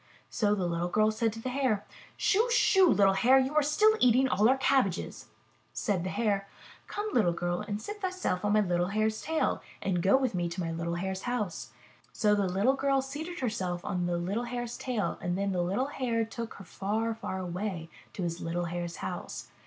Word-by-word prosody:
So 210 -2 +2
the 190 -3 -1
little 170 0 -1
girl 215 +3 +3
said 225 +1 0
to 225 - -8
the 255 - -4
Hare: 250 -6 0 0.3
Shoo! 450 +5 +2
Shoo! 385 -6 +5
little 195 -6 +5
Hare, 245 +7 +5
you 265 +2 +1
are 305 - +4
still 425 +10 +4
eating 255 +2 +5
all 220 -2 +3
our 265 - +4
cabbages." 260 -9 0 0.5
Said 195 -6 -1
the 185 - -2
Hare: 200 -2 0 0.4
Come, 420 +1 -4
little 180 -8 +3
girl, 175 +1 -2
and 210 -1 -4
seat 415 - -7
thyself 370 - -2
on 205 0 +2
my 215 - +5
little 175 -2 +1
Hare's 215 +2 0
tail 320 0 0 0.2
and 180 -3 -1
go 195 +8 +5
with 260 -4 0
me 175 -1 -1
to 170 +2 -6
my 165 -2 -2
little 170 +1 -3
Hare's 190 +2 -3
house." 210 -8 -3 0.4
So 210 -1 +2
the 200 -2 +2
little 200 +8 +2
girl 275 0 +1
seated 310 +6 -6
herself 185 -7 -2
on 180 -1 -1
the 175 0 0
little 200 +8 -2
Hare's 240 -1 -4
tail 240 -6 -2
and 175 +1 -1
then 200 0 0
the 180 -2 0
little 195 +9 0
Hare 240 -5 -1
took 230 +1 -6
her 200 - -11
far, 220 +5 -2
far 220 -4 -5
away 180 -1 -4 0.3
to 190 - -4
his 170 0 -3
little 175 +1 -2
Hare's 175 0 -4
house. - - -6
210 Hz, 210 wpm, -29 LUFS, 180-255 Hz, 0.5 s, Shoo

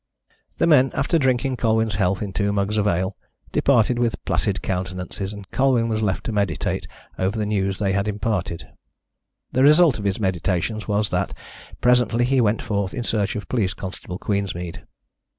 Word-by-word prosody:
The - - +2
men, 140 -5 +5
after 145 +4 +1
drinking 130 -1 +1
Colwyn's 110 -2 +1
health 95 +2 +1
in 100 -2 -5
two 100 0 0
mugs 100 +1 0
of 105 - +1
ale, 95 +1 0 0.4
departed 120 -2 +3
with 115 -5 -1
placid - - 0
countenances, 90 +1 -3
and 100 -2 -9
Colwyn 130 -4 +2
was 110 -1 0
left 100 -3 0
to - - -3
meditate 100 -4 -1 0.3
over 95 +4 0
the 105 - 0
news 100 -2 0
they 100 -2 0
had 100 +1 0
imparted. 105 -5 -2 0.8
The 130 - +1
result 150 -1 +6
of 100 - -5
his 100 +1 0
meditations 95 +2 -1
was 105 0 0
that - - -1 0.3
he - - -16
presently 125 +1 +3
went 110 -1 +1
forth 100 -2 -2
in 120 - -2
search 105 -3 -1
of 105 -3 -5
Police 105 -6 0
Constable 90 -1 -6
Queensmead. 95 -4 -3
105 Hz, 170 wpm, -22 LUFS, 95-120 Hz, 0.8 s, result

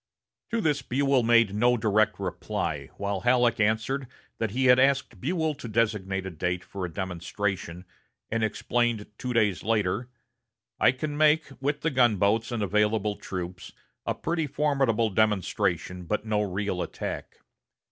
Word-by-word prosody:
To 230 -1 0
this 150 -6 +1
Buell 135 +1 +2
made 115 -3 +4
no 120 +4 +3
direct 110 -1 +2
reply, 95 -2 -3
while 100 -1 -2
Halleck 120 0 +3
answered 110 +6 +1 0.3
that 115 - 0
he 130 +6 0
had 125 0 +7
asked 135 -7 +2
Buell 160 - 0
to 140 -4 -9
designate 105 -4 0
a 95 - -4
date 90 +2 -2
for 100 -2 -7
a - - -11
demonstration, 90 0 -3 0.5
and 115 0 0
explained 115 0 0
two 125 - -3
days 105 -6 +2
later: 110 +2 0 0.7
"I - - +6
can 145 +3 -4
make, 155 +1 +3
with 145 +2 -1
the 165 - 0
gunboats 110 -3 +2
and 115 -3 -1
available 105 +1 +1
troops, 90 -1 -6 0.3
a - - -1
pretty 165 -2 -1
formidable 135 -6 +1
demonstration, 95 -3 0
but 105 +5 -2
no 105 -1 +1
real 100 -2 -2
attack." - - -5
110 Hz, 145 wpm, -27 LUFS, 100-130 Hz, 0.7 s, had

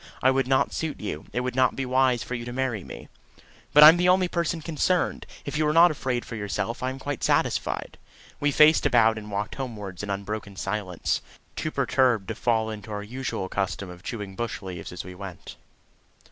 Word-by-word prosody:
I 130 - +6
would 135 -1 +1
not 130 0 +2
suit 160 -3 -3
you. 80 -8 -5
It 125 - -1
would 125 -1 -2
not 130 0 +3
be 135 - -2
wise 130 -1 +2
for - - -6
you 120 -1 -3
to 120 - -5
marry 125 -6 -2
me." - - -10 0.6
"But 150 - +8
I'm 160 +3 +10
the 180 +1 +3
only 185 0 +4
person 170 -1 -1
concerned. 165 +3 0 0.2
If 145 +2 -3
you 155 - +2
are 150 - +2
not 170 +1 +7
afraid 130 -5 -2
for 115 - -7
yourself, 105 +2 -3
I 130 - 0
am 130 - -5
quite 140 -1 -5
satisfied." - - 0 0.4
We 145 - +2
faced 150 +2 +5
about 110 -1 +4
and 105 0 -10
walked 100 +1 -3
homewards 105 -9 -6
in 105 - -6
unbroken 100 +1 -4
silence 95 -3 -2 0.3
too 155 - -2
perturbed 130 -7 +1
to - - -1
fall 110 -2 0
into 105 -1 -8
our 105 0 -4
usual 120 -3 -4
custom 100 -1 -3
of 90 0 -12
chewing 100 -2 -6
bush 115 -1 -4
leaves 90 -3 -7
as 90 - -6
we 90 - -9
went. 95 -2 -9
120 Hz, 205 wpm, -26 LUFS, 100-135 Hz, 0.6 s, I'm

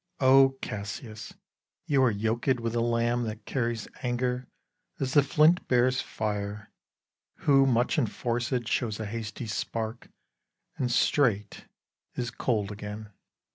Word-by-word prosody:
O 135 0 +6
Cassius, 110 - -6 0.5
you 145 -5 +2
are 130 - +5
yoked 115 +4 0
with 115 -1 -2
a 120 - +1
lamb 120 +1 +1
That 110 0 -6
carries 120 -4 -2
anger 125 0 -1 0.5
as 130 -1 -2
the 145 - +7
flint 155 +5 +3
bears 125 +1 +3
fire; 105 -1 -4 0.7
Who, 135 -1 +5
much 120 -1 +2
enforced, 120 0 -1
shows 110 -3 -1
a 110 - -3
hasty 110 +1 -5
spark, 110 +1 -4 0.7
And 125 -2 -1
straight 110 -6 +1 0.5
is 120 -1 -3
cold 105 -5 -1
again. 105 +1 -7
120 Hz, 125 wpm, -28 LUFS, 110-130 Hz, 0.7 s, the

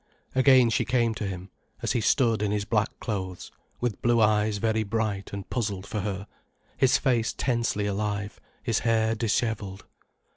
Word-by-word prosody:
Again 130 -2 +5
she - - +2
came 120 -2 +1
to 105 -2 -4
him, 95 0 -6 0.3
as - - 0
he 120 - +1
stood 115 -1 +2
in 105 - +1
his 105 -1 -1
black 105 +1 +1
clothes, 95 -4 -4 0.3
with 120 -5 -2
blue 120 0 +3
eyes 105 -1 +3
very 110 +1 +1
bright 110 -2 -2
and 100 -1 -6
puzzled 100 -5 -2
for 105 - -3
her, 100 -1 -3 0.5
his 130 - +4
face 120 -4 +1
tensely 115 -5 0
alive, 100 0 -2 0.2
his - - +1
hair 110 -1 +2
dishevelled. 110 -3 -1
110 Hz, 160 wpm, -27 LUFS, 100-115 Hz, 0.5 s, Again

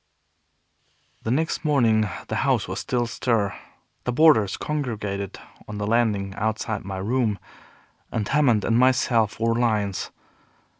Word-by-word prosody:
The - - -4
next 155 +7 0
morning 115 -8 +3 0.2
the - - -2
house - - +1
was - - -4
all 120 -1 +2
astir. 115 -4 0 0.5
The 125 - 0
boarders 125 -8 +4
congregated 105 -9 -3 0.3
on 105 - -6
the 105 - -2
landing 105 -3 +1
outside 110 +1 -2
my 95 -1 -5
room, 110 +1 0 0.7
and 105 -3 -2
Hammond 130 -8 +3
and 115 +1 +2
myself 120 -4 +2
were 115 0 +2
lions. 110 -5 0
115 Hz, 130 wpm, -24 LUFS, 105-125 Hz, 0.7 s, boarders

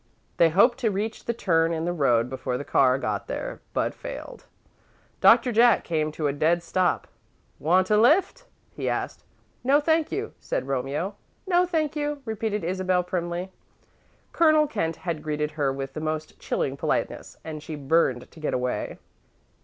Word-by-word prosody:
They 170 - +6
hoped 235 +9 +4
to 235 -4 +1
reach 210 +3 -3
the 235 - 0
turn 165 -6 +2
in 165 0 -2
the 175 - -1
road 125 -7 +2
before 130 -1 -3
the - - -5
car 130 -1 +4
got - - -3
there, - - -5
but - - -1
failed. - - -8 0.7
Doctor 250 - +6
Jack 235 0 +5
came 155 -2 -1
to 155 - -3
a 140 - +1
dead 165 +4 +1
stop. 180 +1 0 0.5
"Want 185 +5 +2
a 210 - +5
lift?" 360 - +3 0.3
he - - -3
asked. - - -3 0.4
"No, 275 +3 +4
thank 320 +1 +1
you," 415 +2 -3
said - - -3
Romeo. 140 +8 -2 0.3
"No, 360 -1 +3
thank 315 -3 -1
you," 295 -1 -3
repeated 220 -3 -2
Isabel, 185 +1 0
primly. 175 +1 -3 0.8
Colonel 310 -2 +4
Kent 165 - -2
had 170 -4 -4
greeted 150 0 -2
her 145 -3 0
with 135 0 -5
the 155 - -5
most 155 0 -4
chilling 135 - -2
politeness, - - -2
and 155 -1 -6
she 155 +1 -6
burned 135 -4 +1
to 165 - -15
get 155 - -1
away. 125 0 -2
175 Hz, 170 wpm, -25 LUFS, 150-235 Hz, 0.8 s, They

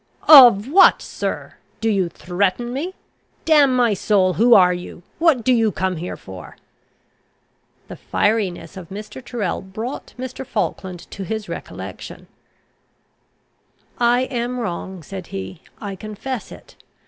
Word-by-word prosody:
"Of 245 -8 +9
what, 370 +8 +6
sir! - - -5 0.2
Do 225 - -1
you 195 -5 +1
threaten 195 +8 -2
me? 340 +8 -4 0.5
Damn 290 -5 +5
my 240 -3 +3
soul! 190 -2 +2
who 235 +4 +5
are 180 -2 +6
you? 175 0 -8 0.2
what 320 -8 +3
do 255 - +3
you 225 -3 +2
come 185 -1 -2
here 175 +3 -6
for?" 95 -1 -11 1.3
The - - -8
fieriness 205 -3 -1
of 175 -3 -10
Mr. 210 +6 -9
Tyrrel 225 -7 -3
brought 215 +7 -7
Mr. 255 +1 -6
Falkland 185 -7 -4
to 200 - -8
his 215 +2 -4
recollection. - - -8 1.7
"I 240 +1 +3
am 250 -1 -3
wrong," 190 -4 -5
said 190 +2 -8
he. 95 -1 -7 0.2
"I 200 -2 -6
confess 215 +5 -6
it. - - -14
215 Hz, 135 wpm, -20 LUFS, 185-245 Hz, 1.7 s, Of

